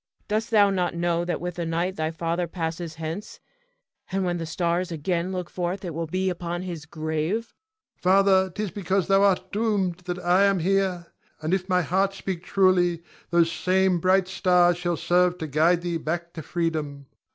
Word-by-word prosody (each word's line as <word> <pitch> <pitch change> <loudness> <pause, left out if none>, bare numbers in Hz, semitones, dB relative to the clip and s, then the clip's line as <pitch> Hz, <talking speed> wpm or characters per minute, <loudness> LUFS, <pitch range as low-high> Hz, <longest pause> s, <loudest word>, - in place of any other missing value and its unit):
Dost 215 +2 -1
thou 205 -3 +5
not 180 -3 -1
know 170 0 0
that 175 0 -2
with 180 0 -5
the 170 - -2
night 170 +3 -1
thy 155 0 -1
father 165 +2 -2
passeth 165 -1 -4
hence, 165 +5 -6 0.7
and 190 0 0
when 175 -1 0
the 165 -1 -4
stars 170 +2 -1
again 170 +3 -1
look 180 -2 -3
forth 180 +2 -3
it 170 - -4
will 165 +1 -3
be 185 +4 -1
upon 175 -1 -3
his 170 -4 -6
grave? 160 +8 -2 0.4
Ion. - - -38
Father, 190 0 +4
'tis 205 +1 -4
because 190 -2 0
thou 195 0 +4
art 190 -2 +2
doomed 200 -5 0
that 180 0 -3
I 180 +3 +3
am 195 -1 +3
here. 185 -1 0 0.3
And 155 +3 -2
if 190 0 -1
my 180 -1 +3
heart 190 +5 +1
speak 190 -3 -4
truly, 180 -3 +2 0.3
those 170 -1 +3
same 185 -1 +2
bright 185 +2 +3
stars 180 -2 +3
shall 175 -1 -1
serve 180 0 +2
to 160 - -4
guide 160 +4 +2
thee 170 -1 -1
back 170 +2 -4
to 160 - -6
freedom. 155 -4 -3
175 Hz, 185 wpm, -25 LUFS, 170-190 Hz, 0.7 s, thou